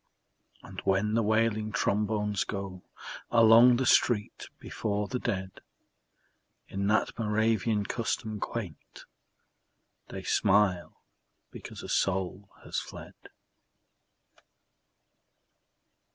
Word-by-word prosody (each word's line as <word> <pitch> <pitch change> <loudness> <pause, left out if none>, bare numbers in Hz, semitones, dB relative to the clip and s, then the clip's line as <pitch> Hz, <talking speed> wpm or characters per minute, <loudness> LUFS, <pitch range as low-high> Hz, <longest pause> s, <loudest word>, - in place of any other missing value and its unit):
And - - -9
when 100 +2 +1
the 115 - +2
wailing 110 0 +1
trombones 105 -1 0
go 95 -2 -6 0.5
Along 115 +1 +7
the 130 +2 0
street 115 -3 +2
before 105 -2 -3
the 125 - -3
dead 95 -3 -4 1.1
In 100 +1 -3
that 110 +3 0
Moravian 110 -1 +1
custom 110 -2 -3
quaint, 100 -10 -7 1.0
They - - -8
smile 95 -5 +1 0.5
because - - -10
a - - -7
soul 95 +1 -1
has - - -3
fled. - - -10
105 Hz, 90 wpm, -29 LUFS, 100-115 Hz, 1.1 s, Along